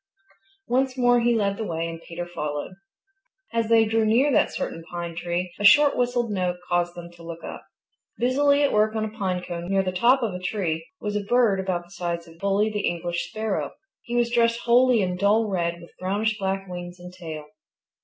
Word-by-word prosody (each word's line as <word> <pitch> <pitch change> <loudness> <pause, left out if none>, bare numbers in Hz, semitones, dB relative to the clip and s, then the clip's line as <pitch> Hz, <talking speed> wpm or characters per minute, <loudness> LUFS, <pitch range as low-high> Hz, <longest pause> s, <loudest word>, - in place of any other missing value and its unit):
Once 260 +1 +1
more 245 -1 +4
he 240 0 +2
led 200 -2 0
the 225 - -3
way 165 -4 -2
and 165 0 -7
Peter 170 +1 -6
followed. 150 -3 -4 0.8
As 230 -1 0
they 225 -1 +6
drew 225 +1 +1
near 240 +7 +3
that - - +3
certain 165 - -4
pine 170 -1 -5
tree, 175 +1 -3
a - - -3
short 290 +7 +7
whistled 245 -2 0
note 180 -3 0
caused 175 0 0
them 170 0 -9
to 170 0 -16
look 165 0 -8
up. - - -8 0.5
Busily 280 +4 +3
at 285 - +2
work 215 +1 +2
on 220 0 0
a 215 0 -7
pine 185 -4 -2
cone 175 0 -5
near 195 0 +2
the 185 - -1
top 240 +8 +3
of 215 -5 -1
a 180 - -5
tree 170 -5 -2
was 210 -1 -3
a 210 - -1
bird 225 -2 +3
about 185 -2 -1
the 175 - -21
size 170 -2 -4
of 165 0 -16
Bully 200 +3 +1
the 210 -1 -1
English 175 0 -2
Sparrow. 220 -2 -2 0.3
He 240 - -5
was 240 -1 +2
dressed 235 0 +2
wholly 240 -2 +4
in 180 -1 -2
dull 210 +4 +3
red 170 -3 -1
with 170 - -14
brownish 205 +4 0
black 195 0 -2
wings 175 0 -7
and 180 0 -10
tail. 160 -4 -7
195 Hz, 210 wpm, -25 LUFS, 175-230 Hz, 0.8 s, short